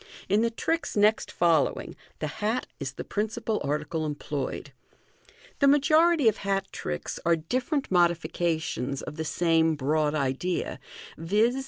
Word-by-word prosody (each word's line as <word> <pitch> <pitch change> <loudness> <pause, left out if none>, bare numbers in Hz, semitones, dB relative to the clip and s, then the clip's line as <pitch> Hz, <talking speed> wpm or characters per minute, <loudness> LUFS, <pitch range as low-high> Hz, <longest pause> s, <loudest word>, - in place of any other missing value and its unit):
In 205 +3 +3
the 230 - +2
tricks 325 +4 -2
next 210 +2 +3
following 165 -4 +1 0.2
the - - -3 0.2
hat 220 +4 0
is - - -4
the - - -6
principal 215 +1 -2
article 150 +3 -2
employed 145 -2 -4 0.9
The 280 - +5
majority 310 +1 +5
of 220 - +4
hat 195 -1 -1
tricks 75 0 -4
are 170 0 +4
different 255 - -2
modifications 165 -6 0
of 150 - -7
the 160 - -3
same 165 -1 +2
broad 150 +2 +1
idea, 145 +5 -1 0.4
viz. 210 +9 +2
175 Hz, 135 wpm, -27 LUFS, 155-220 Hz, 0.9 s, The